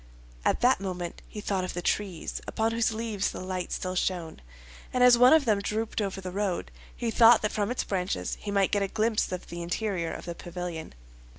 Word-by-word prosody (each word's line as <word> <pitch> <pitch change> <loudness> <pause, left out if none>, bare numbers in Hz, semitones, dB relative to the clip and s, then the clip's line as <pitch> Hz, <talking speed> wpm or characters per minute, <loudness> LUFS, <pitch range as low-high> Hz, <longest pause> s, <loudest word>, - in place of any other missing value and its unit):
At - - +1
that 250 +2 +4
moment 180 -3 -4
he 210 - -7
thought 195 -2 -1
of 180 - -4
the 175 - -2
trees, 190 -5 -2
upon 225 +1 0
whose 230 0 +1
leaves 220 -3 -1
the - - -7
light 185 -1 -4
still 185 0 -2
shone; 180 -3 -2 0.5
and 250 0 +2
as 250 -1 +8
one 250 +2 +7
of 315 -3 +6
them 215 -3 +3
drooped 215 +2 -2
over 195 -1 -2
the 185 -1 -5
road, 195 -2 -2 0.2
he 235 -2 -2
thought 230 -1 +7
that 210 - +1
from 205 -1 -1
its 250 - -1
branches 185 -1 -2
he 205 - -5
might 200 -1 +2
get 205 - +2
a 195 - +1
glimpse 220 +1 0
of 180 - -4
the 170 0 -6
interior 175 -1 -2
of - - -7
the 170 - -4
pavilion. 175 - -6
200 Hz, 215 wpm, -28 LUFS, 180-225 Hz, 0.5 s, as